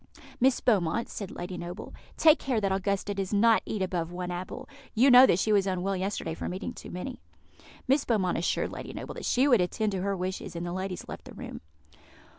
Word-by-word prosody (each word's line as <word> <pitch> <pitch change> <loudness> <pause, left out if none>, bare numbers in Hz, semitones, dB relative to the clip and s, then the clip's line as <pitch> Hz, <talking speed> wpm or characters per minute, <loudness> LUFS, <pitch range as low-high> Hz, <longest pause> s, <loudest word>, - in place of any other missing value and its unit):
"Miss 260 +1 +4
Beaumont," 215 -1 +1
said 200 -3 -6
Lady 180 +1 -6
Noble, 175 +4 -7 0.2
"take 315 -1 +6
care 255 -5 0
that 200 -2 0
Augusta 200 +1 -1
does 195 -2 -3
not 220 +2 +4
eat 205 -3 -1
above 175 -3 -2
one 180 0 -4
apple; 185 +9 -6 0.3
you 255 +5 +6
know 250 +1 +10
that - - +3
she 215 +3 +2
was 200 -1 +3
unwell 190 +1 -1
yesterday 190 -3 -2
from 180 - -4
eating 185 - -5
too - - -10
many." 240 +9 -6 0.7
Miss 270 +2 +3
Beaumont 190 -8 +1
assured 170 - 0
Lady - - -7
Noble - - -6
that - - -7
she 260 +3 +3
would 240 -8 +5
attend 210 +4 0
to 190 -2 -2
her 200 0 -1
wishes, 185 0 -4
and 170 +1 -3
the 175 - -4
ladies 185 0 -4
left - - -8
the - - -11
room. - - -8
195 Hz, 215 wpm, -28 LUFS, 180-230 Hz, 0.7 s, know